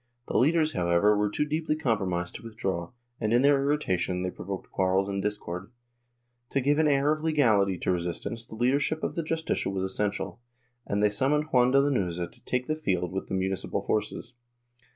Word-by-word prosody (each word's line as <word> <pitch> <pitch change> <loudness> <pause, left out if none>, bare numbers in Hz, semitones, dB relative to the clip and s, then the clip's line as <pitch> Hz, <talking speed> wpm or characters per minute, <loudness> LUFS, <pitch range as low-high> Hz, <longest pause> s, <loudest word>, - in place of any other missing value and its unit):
The - - -5
leaders, 155 +3 +3
however 90 +4 +3
were 105 0 +1
too 150 - 0
deeply 155 +1 -1
com 125 -8 +1
promised 90 -2 -2
to - - -9
withdraw 95 -7 -3 0.3
and, 110 -1 -1
in 120 +2 +4
their 140 -1 +5
irritation, 95 - 0
they 90 - -2
provoked 95 +1 -7
quarrels 95 +1 +1
and 100 -1 -2
discord. 100 -2 -4 0.8
To 140 - +1
give 145 +3 +2
an 160 - +4
air 140 0 +3
of 155 0 -1
legality 110 - +3
to 90 - 0
resistance 90 +6 -3
the - - -9
leadership 140 +7 +1
of - - -1
the 170 - -1
Justicia 160 -6 -1
was 95 -1 -2
essential, 100 +3 -2 0.5
and 100 +1 0
they 105 - +5
summoned 145 +9 +1
Juan 125 -1 +5
de 135 +2 +5
Lanuza 95 -12 0
to - - -16
take 125 0 -1
the 155 - -1
field 90 - -1
with 95 +1 -4
the - - -3
municipal 95 -1 -2
forces. 110 +3 -2
105 Hz, 195 wpm, -28 LUFS, 95-145 Hz, 0.8 s, their